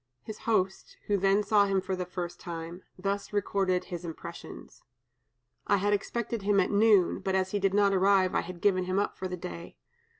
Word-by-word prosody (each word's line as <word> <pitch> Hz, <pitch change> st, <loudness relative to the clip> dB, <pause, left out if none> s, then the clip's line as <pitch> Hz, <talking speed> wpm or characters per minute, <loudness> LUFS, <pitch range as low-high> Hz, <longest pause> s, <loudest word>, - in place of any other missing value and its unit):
His 215 Hz, -1 st, -8 dB
host, 190 Hz, -4 st, 0 dB
who 205 Hz, -, +1 dB
then 195 Hz, +1 st, +3 dB
saw 205 Hz, -1 st, +4 dB
him 195 Hz, -1 st, +2 dB
for 190 Hz, 0 st, -3 dB
the 180 Hz, -1 st, -4 dB
first 175 Hz, -1 st, -5 dB
time, 170 Hz, 0 st, -7 dB, 0.2 s
thus 200 Hz, +2 st, -3 dB
recorded 195 Hz, -3 st, 0 dB
his 175 Hz, -1 st, -7 dB
impressions: 165 Hz, -2 st, -9 dB, 0.9 s
"I 200 Hz, -, +4 dB
had 205 Hz, +2 st, +1 dB
expected 230 Hz, +2 st, -2 dB
him 200 Hz, 0 st, +2 dB
at 185 Hz, -, +1 dB
noon, 205 Hz, -3 st, +4 dB
but 190 Hz, -1 st, -1 dB
as 190 Hz, 0 st, 0 dB
he 205 Hz, -, 0 dB
did 195 Hz, 0 st, +1 dB
not 200 Hz, -1 st, +4 dB
arrive, 190 Hz, -1 st, +3 dB
I -, -, +2 dB
had 175 Hz, -1 st, -9 dB
given 185 Hz, -3 st, +2 dB
him 185 Hz, +1 st, -1 dB
up 205 Hz, -, 0 dB
for 185 Hz, -, -4 dB
the 180 Hz, 0 st, -5 dB
day. 170 Hz, -1 st, -8 dB
195 Hz, 200 wpm, -29 LUFS, 185-205 Hz, 0.9 s, saw